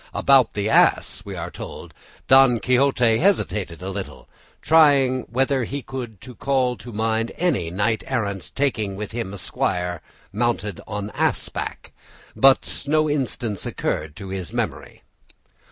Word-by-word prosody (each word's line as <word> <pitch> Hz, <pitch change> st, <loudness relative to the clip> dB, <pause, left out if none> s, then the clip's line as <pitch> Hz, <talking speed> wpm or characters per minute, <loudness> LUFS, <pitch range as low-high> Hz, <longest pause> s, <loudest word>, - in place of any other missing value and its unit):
"About 135 Hz, -3 st, +4 dB
the 105 Hz, 0 st, -1 dB
ass," -, -, +3 dB
we -, -, -7 dB
are -, -, -5 dB
told, -, -, -9 dB, 0.3 s
"Don 130 Hz, -3 st, +6 dB
Quixote 125 Hz, -2 st, +3 dB
hesitated 105 Hz, -, 0 dB
a 95 Hz, -, -4 dB
little, -, -, -7 dB, 0.3 s
trying 140 Hz, -5 st, +4 dB
whether 130 Hz, +2 st, +1 dB
he 140 Hz, +4 st, -5 dB
could 125 Hz, -5 st, -6 dB, 0.2 s
call 130 Hz, -3 st, +1 dB
to 120 Hz, +2 st, -10 dB
mind 110 Hz, +1 st, -1 dB
any 140 Hz, -, 0 dB
knight 105 Hz, +5 st, 0 dB
errant 100 Hz, -, -3 dB
taking 110 Hz, -8 st, 0 dB
with 105 Hz, +2 st, -6 dB
him 115 Hz, -2 st, -3 dB
an 100 Hz, -, -8 dB
esquire 90 Hz, -2 st, -2 dB, 0.3 s
mounted 105 Hz, -3 st, -1 dB
on 105 Hz, 0 st, -4 dB
ass -, -, -1 dB
back; -, -, -6 dB, 0.4 s
but 135 Hz, +1 st, +3 dB
no 155 Hz, +1 st, +3 dB
instance 125 Hz, -8 st, -2 dB
occurred 75 Hz, -1 st, -3 dB
to 95 Hz, +2 st, -8 dB
his 95 Hz, -2 st, -5 dB
memory." -, -, -4 dB
115 Hz, 140 wpm, -22 LUFS, 100-135 Hz, 0.4 s, Don